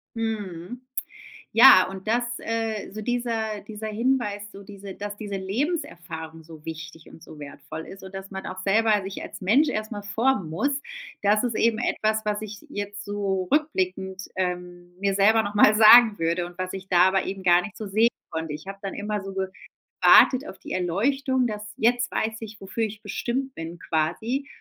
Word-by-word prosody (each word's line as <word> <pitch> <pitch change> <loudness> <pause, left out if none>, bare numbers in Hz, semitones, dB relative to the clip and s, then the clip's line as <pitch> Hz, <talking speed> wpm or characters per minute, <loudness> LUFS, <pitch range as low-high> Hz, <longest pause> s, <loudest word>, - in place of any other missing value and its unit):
Mhm. 220 -1 -4 0.7
Ja, 225 -6 +9
und 190 +2 -8
das, 240 +2 +2 0.2
äh 225 -2 -3
so 215 - -6
dieser 225 -3 -2
dieser 215 +1 -8
Hinweis 220 -2 0
so 200 - -11
diese 200 -1 -9
dass 205 0 -6
diese 205 -2 -5
Lebenserfahrung 175 - -4
so 160 -1 -14
wichtig 165 0 -8
und 165 - -15
so 155 - -12
wertvoll 155 +2 -8
ist. 195 0 -11
Und 190 0 -11
dass 195 +1 -7
man 190 0 -6
auch 185 - -6
selber 210 0 +3
sich 195 +1 -6
als - - -9
Mensch 250 +11 +4
erst 215 +1 -3
mal 205 -1 -5
formen 210 -4 0
muss. 265 - 0 0.5
Das 210 +3 +3
ist 235 -3 -1
eben 225 -1 +2
etwas, 220 -2 0
was 210 0 -1
ich 210 -1 -7
jetzt 205 -1 -5
so 195 -3 -2
rückblickend, 190 -10 0
ähm, 180 -1 -4
mir 200 0 0
selber 220 +3 +5
noch 205 0 -5
mal 210 +1 +6
sagen 220 0 +8
würde 170 +2 0
und 175 +1 -13
was 185 0 -3
ich 190 0 -8
da 180 -1 +5
aber 190 0 +1
eben 195 0 -5
gar 175 0 +6
nicht 205 - -9
so 215 - -6
sehen 220 +4 +3 0.2
konnte. 160 -2 -4
Ich 155 +5 -9
hab 195 0 -8
dann 195 - -4
immer 210 0 -3
so 195 0 -7 0.5
gewartet 265 +2 +5
auf - - -10
die - - -7
Erleuchtung, 250 +8 +1
das 210 -1 -5
„jetzt 240 +2 +2
weiß 220 0 -1
ich, 215 -1 -9
wofür 210 +4 -3
ich 215 0 -4
bestimmt 265 +2 -3
bin” 165 +1 -7
quasi. 220 - -1
205 Hz, 190 wpm, -25 LUFS, 185-225 Hz, 0.7 s, Ja